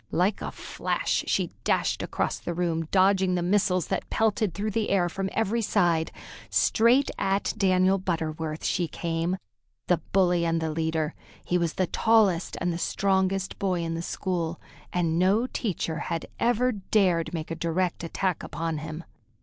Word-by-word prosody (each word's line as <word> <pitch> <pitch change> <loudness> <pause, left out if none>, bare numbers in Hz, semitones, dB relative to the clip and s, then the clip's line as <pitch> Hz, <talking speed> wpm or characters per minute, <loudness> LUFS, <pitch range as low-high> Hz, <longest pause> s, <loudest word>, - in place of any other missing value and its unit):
Like 190 +4 +1
a - - -4
flash - - -2
she - - 0
dashed - - +1
across - - -2
the 170 - -4
room, 165 -2 -1
dodging 190 -1 +3
the 175 - 0
missiles 185 -2 +2
that - - -2
pelted 215 -4 +1
through 210 +1 -2
the 220 +1 -1
air 185 -3 +3
from 195 +3 -3
every 225 +1 0
side. 170 -6 +2 0.4
Straight 245 +5 +4
at 195 +1 0
Daniel 190 -1 +3
Butterworth 160 -3 -3
she 175 -2 +1
came, 165 +3 -2 0.5
the 180 - +3
bully 180 -3 +3
and 165 0 +1
the 160 -1 -2
leader. 160 0 -1 0.3
He 180 - +1
was 170 -2 0
the 185 - +1
tallest 200 -2 +2
and 175 -1 -1
strongest 195 0 0
boy 185 -3 0
in 165 0 -2
the 165 - -3
school, 170 -2 -2 0.3
and 170 -2 +1
no 200 +6 +3
teacher 175 -10 -2
had 165 -1 -3
ever 245 +1 +2
dared 185 -6 +1
make 165 -1 -5
a - - -1
direct 170 +2 -1
attack 180 +1 -1
upon 160 0 -3
him. 155 +2 -6
180 Hz, 160 wpm, -27 LUFS, 165-195 Hz, 0.5 s, Straight